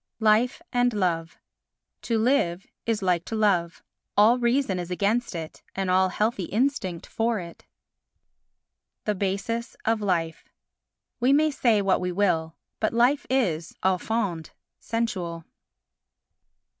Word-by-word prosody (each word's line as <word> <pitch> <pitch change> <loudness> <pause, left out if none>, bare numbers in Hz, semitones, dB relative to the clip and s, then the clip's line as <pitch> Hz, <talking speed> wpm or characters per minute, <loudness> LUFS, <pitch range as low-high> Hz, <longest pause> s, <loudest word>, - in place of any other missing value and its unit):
Life 225 +8 +3
and 245 0 +2
Love 165 -5 -1 0.6
To 230 - 0
live 220 -7 +1 0.2
is 225 -3 0
like 180 -2 +2
to 225 - -4
love—all 205 +3 +1
reason 240 -5 +1
is 175 -1 -5
against 205 +4 0
it, 160 -2 -7
and 190 -1 -1
all 185 0 +4
healthy 210 -1 -1
instinct 210 -6 -1
for 225 -1 -1
it. 170 -2 -10 1.4
The 210 - +1
Basis 200 +5 -2
of 225 -1 +1
Life 170 -5 -1 0.7
We 255 +3 +4
may 305 +2 +4
say 230 -7 +2
what 195 -1 +2
we 180 0 -1
will, 170 -4 0 0.2
but 215 - 0
Life 245 +5 +3
is, 180 -12 0
au 185 -1 +3
fond, 200 -8 -2 0.3
sensual. 180 -8 -3
205 Hz, 125 wpm, -26 LUFS, 180-235 Hz, 1.4 s, all